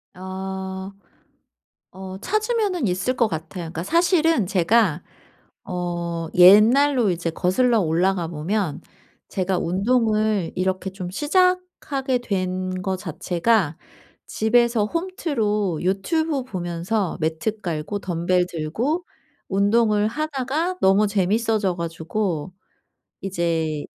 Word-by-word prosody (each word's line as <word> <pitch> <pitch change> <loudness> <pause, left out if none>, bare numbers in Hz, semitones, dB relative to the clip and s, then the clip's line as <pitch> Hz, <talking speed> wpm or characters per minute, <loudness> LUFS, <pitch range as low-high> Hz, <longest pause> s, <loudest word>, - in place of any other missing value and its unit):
어. 190 +1 -6 1.0
어 190 0 -8
찾으면은 425 - 0
있을 190 +7 -1
것 235 -2 +3
같아요. 160 +1 -5
그러니까 165 0 -5
사실은 330 - +2
제가 185 -2 +2 0.6
어 170 -2 -3
옛날로 225 +6 +6
이제 170 -1 -2
거슬러 225 +8 +2
올라가 175 +1 +1
보면 170 +2 -2 0.5
제가 185 -1 -1
운동을 215 0 +1
이렇게 185 +1 -1
좀 185 -2 -6
시작하게 295 - 0
된 185 -4 -2
거 190 -1 -1
자체가 180 0 0 0.5
집에서 235 0 +2
홈트로 220 - -1
유튜브 275 - 0
보면서 180 -1 -2
매트 165 +7 -2
깔고 170 +4 -3
덤벨 180 0 0
들고 220 - -2 0.4
운동을 210 +2 +2
하다가 305 +6 -2
너무 195 +2 +5
재미있어져 205 0 +1
가지고 170 +1 -3 0.7
이제 165 -5 -1
195 Hz, 230 characters per minute, -23 LUFS, 175-235 Hz, 1.0 s, 옛날로